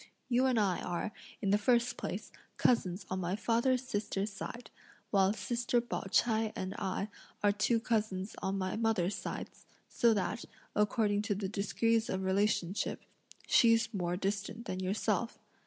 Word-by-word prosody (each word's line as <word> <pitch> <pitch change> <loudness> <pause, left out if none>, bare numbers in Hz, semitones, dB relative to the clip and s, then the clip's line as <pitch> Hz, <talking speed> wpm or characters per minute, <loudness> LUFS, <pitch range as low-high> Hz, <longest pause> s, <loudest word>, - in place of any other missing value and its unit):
You 250 +1 +4
and 250 -3 +3
I 195 -4 +2
are, 175 +4 -2 0.3
in 195 - +2
the 205 - +4
first 240 +2 +3
place, - - -5 0.3
cousins 190 -6 +2
on 185 - -1
my 180 +1 -1
father's 240 +3 +1
sister's 205 -2 -2
side; 230 +3 -7 0.4
while 195 -1 +4
sister 240 +2 0
Pao 240 - -4
ch'ai 220 -2 +2
and 190 +1 -3
I 195 +1 -1 0.4
are 205 - +5
two 210 +4 +2
cousins 215 -4 -1
on 190 +1 -1
mother's 195 0 0
sides, - - -6 0.2
so 235 - +4
that, 200 +4 -1 0.3
according 210 0 +2
to 205 -1 -1
the 195 0 -2
degrees 220 +3 +1
of 190 0 -1
relationship, 195 0 0 0.4
she's 230 0 +4
more 180 -3 -1
distant 200 +4 -3
than 185 -4 -3
yourself. 205 +4 0
210 Hz, 150 wpm, -33 LUFS, 190-230 Hz, 0.4 s, are